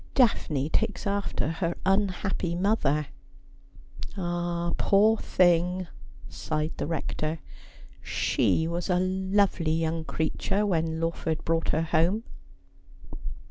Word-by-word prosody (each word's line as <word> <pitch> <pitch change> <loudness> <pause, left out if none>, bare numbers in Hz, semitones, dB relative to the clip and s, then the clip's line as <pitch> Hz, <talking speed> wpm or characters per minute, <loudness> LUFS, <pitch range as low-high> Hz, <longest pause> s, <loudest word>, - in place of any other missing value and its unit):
Daphne 155 - +2
takes 210 +4 -1
after 200 -6 -1
her 170 0 -2
unhappy 190 -2 0
mother.' 170 -6 +1 0.6
' - - -13
Ah, 175 -1 -2
poor 215 +3 +4
thing 180 0 +2 0.2
!' - - -20
sighed 155 0 -3
the - - -2
Rector. 155 0 -2 0.4
' - - -21 0.2
She 160 - +2
was 170 +3 -3
a 180 - +3
lovely 185 -2 +1
young 165 0 -1
creature 165 +6 -1
when 160 -4 0
Lawford 165 -1 -2
brought 165 0 0
her 160 - +2
home.' 170 +7 +1
175 Hz, 115 wpm, -27 LUFS, 160-195 Hz, 0.6 s, poor